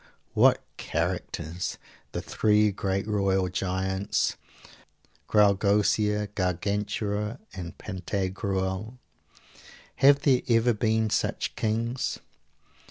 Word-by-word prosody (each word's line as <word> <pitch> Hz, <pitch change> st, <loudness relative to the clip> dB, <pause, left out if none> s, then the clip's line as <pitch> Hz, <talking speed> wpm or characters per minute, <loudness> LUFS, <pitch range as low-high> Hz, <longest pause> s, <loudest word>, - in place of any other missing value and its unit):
What -, -, +4 dB
characters! 85 Hz, +3 st, -3 dB, 0.3 s
The -, -, -4 dB
three 105 Hz, -1 st, +3 dB
great 95 Hz, +1 st, -2 dB
royal 95 Hz, -3 st, +1 dB
giants, 95 Hz, +1 st, -1 dB, 0.9 s
Graugousier, 105 Hz, 0 st, +3 dB
Gargantua 105 Hz, +3 st, -1 dB, 0.2 s
and 90 Hz, -3 st, -7 dB
Pantagruel 95 Hz, +2 st, -3 dB, 1.0 s
have 140 Hz, +1 st, +6 dB
there 135 Hz, -4 st, +3 dB
ever 115 Hz, +1 st, +4 dB
been 110 Hz, 0 st, +1 dB
such -, -, -1 dB
kings? 115 Hz, +3 st, -1 dB
105 Hz, 80 wpm, -27 LUFS, 95-110 Hz, 1.0 s, have